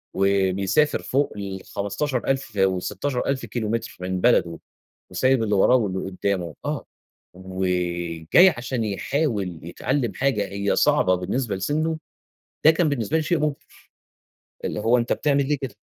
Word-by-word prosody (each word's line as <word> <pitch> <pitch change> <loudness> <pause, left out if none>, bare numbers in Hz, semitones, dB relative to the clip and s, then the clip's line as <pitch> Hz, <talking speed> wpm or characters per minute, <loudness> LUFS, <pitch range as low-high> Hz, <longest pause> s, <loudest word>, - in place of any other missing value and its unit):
و - - -5 0.3
بيسافر 100 +11 +1
فوق 140 +2 0
ال15000 100 +7 -2 0.2
وال16000 95 +8 0
كيلومتر 115 -2 -4
من 90 0 -2
بلده 85 -9 +3 0.5
وسايب 130 +6 +2
اللي 105 -2 +1
وراه 100 +6 +5
واللي 100 -6 0
قُدّامه، 90 -3 -2
آه، - - -3 0.5
وجاي 90 - +2
عشان 120 0 -2
يحاول 105 - -1
يتعلّم 120 - -2
حاجة 130 -7 0
هي 100 +1 -1
صعبة 95 0 +3
بالنسبة 100 +4 -2
لسنُّه، 155 +11 -1 0.7
ده 155 - +9
كان 160 0 +2
بالنسبة 130 0 0
لي 160 - +1
شيء 165 +2 +1
مُبهِر، 150 -2 0 1.1
اللي - - -2
هو 120 +3 +3
أنت 120 - 0
بتعمل 140 -2 +1
ليه 150 - +1
كده؟ 130 -6 -6
110 Hz, 130 wpm, -23 LUFS, 95-135 Hz, 1.1 s, ده